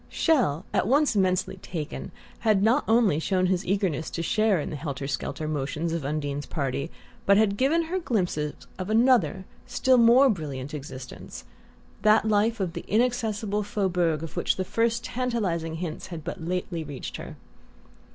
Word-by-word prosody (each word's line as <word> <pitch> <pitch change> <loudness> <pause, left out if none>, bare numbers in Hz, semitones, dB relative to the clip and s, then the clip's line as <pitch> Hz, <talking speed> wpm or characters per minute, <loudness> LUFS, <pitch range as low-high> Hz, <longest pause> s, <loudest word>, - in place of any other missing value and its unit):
Chelles, 240 - +2
at - - +2
once 280 0 +3
immensely 185 -1 +1
"taken," 165 -4 -6 0.3
had 215 -4 +3
not 240 +7 +4
only 225 -9 +4
shown 185 +2 +1
his 185 -1 +1
eagerness 185 -5 -1
to 165 - -4
share 215 +1 +2
in - - -4
the - - -4
helter 140 -2 -4
skelter 155 +2 -3
motions 155 +3 -2
of 165 -3 -2
Undine's 145 0 -3
party, 140 0 -2 0.4
but 200 0 +6
had 210 -2 +3
given 285 +9 +2
her 355 +3 -2
glimpses 180 - -1 0.2
of 185 +2 -4
another, 220 - +3 0.2
still 255 -1 +3
more 240 +4 +7
brilliant 145 - -3
existence, 135 -3 -8 0.6
that 215 +1 +4
life 215 +2 +2
of 185 -4 -2
the - - -6
inaccessible 220 -3 0
"Faubourg" 180 -6 0
of 165 - -7
which - - +1
the 185 - -2
first 230 +4 0
tantalizing 205 -12 -2
hints 165 -1 -5
had 165 -4 -7
but 175 +2 -6
lately 175 -1 -2
reached 145 -3 -6
her. - - -8
185 Hz, 160 wpm, -26 LUFS, 155-225 Hz, 0.6 s, more